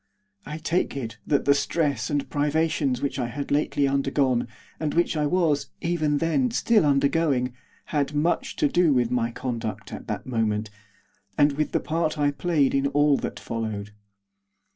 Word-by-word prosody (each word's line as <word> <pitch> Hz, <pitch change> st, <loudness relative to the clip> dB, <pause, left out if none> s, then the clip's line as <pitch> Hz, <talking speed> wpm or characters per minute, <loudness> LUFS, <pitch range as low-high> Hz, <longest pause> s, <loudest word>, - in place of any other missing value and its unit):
I 150 Hz, -, -5 dB
take 160 Hz, -1 st, -1 dB
it 115 Hz, -4 st, -5 dB
that 145 Hz, -, +1 dB
the 140 Hz, -, +6 dB
stress 145 Hz, 0 st, 0 dB
and 145 Hz, -1 st, -1 dB
privations 145 Hz, -3 st, 0 dB
which 140 Hz, -1 st, -2 dB
I 120 Hz, -, 0 dB
had 140 Hz, +4 st, -5 dB
lately 145 Hz, -1 st, +2 dB
undergone, 135 Hz, -3 st, +1 dB, 0.3 s
and 155 Hz, -1 st, -2 dB
which 170 Hz, -1 st, +2 dB
I 150 Hz, -1 st, +1 dB
was, 160 Hz, -3 st, +1 dB
even 155 Hz, -4 st, 0 dB
then, 165 Hz, -, +1 dB
still 220 Hz, -6 st, +3 dB
undergoing, 140 Hz, -2 st, +2 dB, 0.4 s
had 145 Hz, 0 st, 0 dB
much 175 Hz, -, 0 dB
to 300 Hz, -, +2 dB
do 175 Hz, -, +3 dB
with 120 Hz, -2 st, +1 dB
my 120 Hz, -2 st, +1 dB
conduct 115 Hz, -2 st, -5 dB
at -, -, -8 dB
that -, -, -4 dB
moment, 110 Hz, -3 st, -1 dB, 0.7 s
and 145 Hz, 0 st, +5 dB
with 150 Hz, +2 st, -1 dB
the -, -, +1 dB
part 160 Hz, 0 st, -1 dB
I 145 Hz, -1 st, +2 dB
played 145 Hz, -2 st, +1 dB
in 140 Hz, 0 st, +2 dB
all 145 Hz, 0 st, +3 dB
that -, -, -5 dB
followed. 110 Hz, -3 st, -4 dB
145 Hz, 165 wpm, -25 LUFS, 130-155 Hz, 0.7 s, the